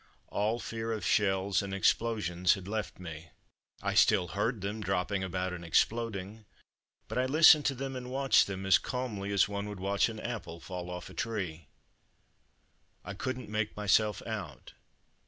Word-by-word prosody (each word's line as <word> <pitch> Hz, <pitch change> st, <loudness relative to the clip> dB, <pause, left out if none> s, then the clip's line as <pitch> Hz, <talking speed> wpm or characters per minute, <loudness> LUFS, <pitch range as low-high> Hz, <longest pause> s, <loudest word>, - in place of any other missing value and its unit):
All 110 Hz, +3 st, 0 dB
fear 115 Hz, -1 st, -4 dB
of 110 Hz, -4 st, -3 dB
shells 95 Hz, -1 st, +2 dB
and 100 Hz, -1 st, -4 dB
explosions 100 Hz, -4 st, +2 dB
had 95 Hz, -1 st, -9 dB
left 110 Hz, +1 st, -3 dB
me. 80 Hz, -2 st, -9 dB, 0.5 s
I -, -, 0 dB
still 95 Hz, -5 st, +4 dB
heard 105 Hz, +2 st, -1 dB
them 105 Hz, +3 st, -3 dB
dropping 95 Hz, 0 st, -1 dB
about 95 Hz, 0 st, -2 dB
and 85 Hz, -1 st, -7 dB
exploding, 105 Hz, +3 st, 0 dB, 0.6 s
but -, -, -2 dB
I 130 Hz, -, +1 dB
listened 155 Hz, +1 st, +7 dB
to 135 Hz, -, 0 dB
them 135 Hz, +1 st, -4 dB
and 125 Hz, -1 st, -6 dB
watched 135 Hz, +1 st, +4 dB
them 95 Hz, -1 st, -5 dB
as 95 Hz, 0 st, +6 dB
calmly 110 Hz, -6 st, -4 dB
as 100 Hz, -, +4 dB
one 100 Hz, 0 st, -4 dB
would 105 Hz, -2 st, -7 dB
watch 100 Hz, +4 st, +1 dB
an 110 Hz, -1 st, -7 dB
apple 110 Hz, -9 st, -5 dB
fall 90 Hz, -1 st, -6 dB
off 90 Hz, +1 st, -7 dB
a -, -, -12 dB
tree. 90 Hz, -7 st, -4 dB, 1.4 s
I 100 Hz, -, -5 dB
couldn't 130 Hz, +5 st, -4 dB
make 105 Hz, 0 st, -2 dB
myself 105 Hz, +1 st, +2 dB
out. 95 Hz, -, -6 dB
100 Hz, 165 wpm, -31 LUFS, 95-115 Hz, 1.4 s, listened